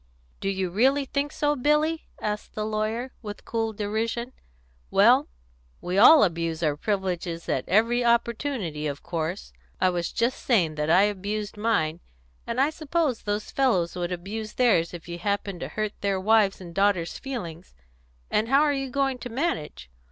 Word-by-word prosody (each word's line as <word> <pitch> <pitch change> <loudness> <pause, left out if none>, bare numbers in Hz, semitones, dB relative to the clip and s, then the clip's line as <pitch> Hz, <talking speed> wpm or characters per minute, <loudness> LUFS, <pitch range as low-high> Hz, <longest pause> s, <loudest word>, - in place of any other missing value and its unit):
"Do 195 - -2
you 190 -2 -2
really 265 +8 +3
think 280 +2 -2
so, 295 0 0
Billy?" 300 +4 +1
asked 210 0 -4
the 215 - -2
lawyer, 220 +4 -2
with 210 -3 -8
cool 225 -1 -1
derision. 225 +4 -3 0.6
"Well, - - +5 0.5
we 180 +2 -1
all 295 +7 +9
abuse 165 -3 -1
our 150 -2 +2
privileges 180 -2 -2
at - - -2
every 230 +6 +3
opportunity, 235 - 0
of 140 -1 -5
course; 170 +2 -4 0.3
I 185 - +3
was 175 -1 -2
just 235 +2 -1
saying 180 -11 +2
that 150 0 -2
I 185 +4 +6
abused 205 +1 -2
mine; 190 -7 0 0.5
and 235 +2 -2
I 280 +3 +3
suppose 310 -5 -1
those 205 0 -3
fellows 205 -11 +1
would 175 0 -3
abuse 210 +5 -5
theirs 210 -10 +3
if 175 -1 -9
you 170 0 -6
happened 200 -1 -2
to - - -4
hurt 215 -1 -3
their 200 -1 0
wives' 210 0 +3
and 175 -2 -10
daughters' 195 -3 +1
feelings. 180 - -7 0.6
And 215 +1 +1
how 275 +2 +5
are 300 -1 +3
you 270 -1 -3
going 270 -1 0
to 245 - -6
manage? 195 - -3
210 Hz, 165 wpm, -26 LUFS, 175-245 Hz, 0.6 s, all